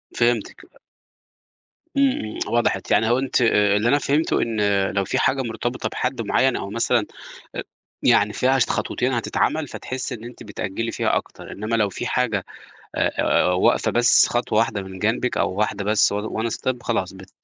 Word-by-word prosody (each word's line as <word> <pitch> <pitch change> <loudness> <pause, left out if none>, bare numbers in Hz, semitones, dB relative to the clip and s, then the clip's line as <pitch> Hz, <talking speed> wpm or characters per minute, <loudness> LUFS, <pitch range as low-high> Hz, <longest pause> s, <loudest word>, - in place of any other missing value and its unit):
فهمتِك 120 -3 0
ب - - -25 1.3
إمم، 275 -1 +4
إمم، 110 - -5
وضحت 120 0 0
يعني 110 +1 +3
هو 120 - +3
أنتِ 135 -1 0
آآ، 105 -3 +3
اللي 115 +3 +1
أنا 145 - +4
فهمته 145 +3 +1
إن 105 -3 +1
لو 100 0 0
في - - -1
حاجة 135 0 +2
مرتبطة 120 +1 -3
بحد 125 -2 -2
معيّن 130 +4 +2
أو 100 - -4
مثلًا 115 +3 +1 0.5
أ - - -2 0.4
يعني 105 +1 +4
فيها 130 +3 +2
ش - - +4
خطوتين 130 +1 -1
هتتعمل، 145 +5 0
فتحسي 130 0 -5
إن 110 - -12
أنتِ 120 0 -10
بتأجلي 105 +2 -4
فيها - - 0
أكتر، - - -5
إنما 110 +3 -3
لو 105 -3 +2
في 110 +6 -5
حاجة 115 -6 0 0.5
آآ، - - +1
واقفة 90 - +2
بس 120 +1 +5
خطوة 120 -3 0
واحدة 110 -3 +1
من 95 0 -9
جنبِك 115 +4 0
أو - - +1
واحدة 100 -1 -1
بس 105 -1 +3
on - - 0
one 110 +2 -2
step 125 -2 -3
خلاص، 95 -6 -1
بت 95 0 -13
115 Hz, 180 wpm, -22 LUFS, 105-125 Hz, 1.3 s, بس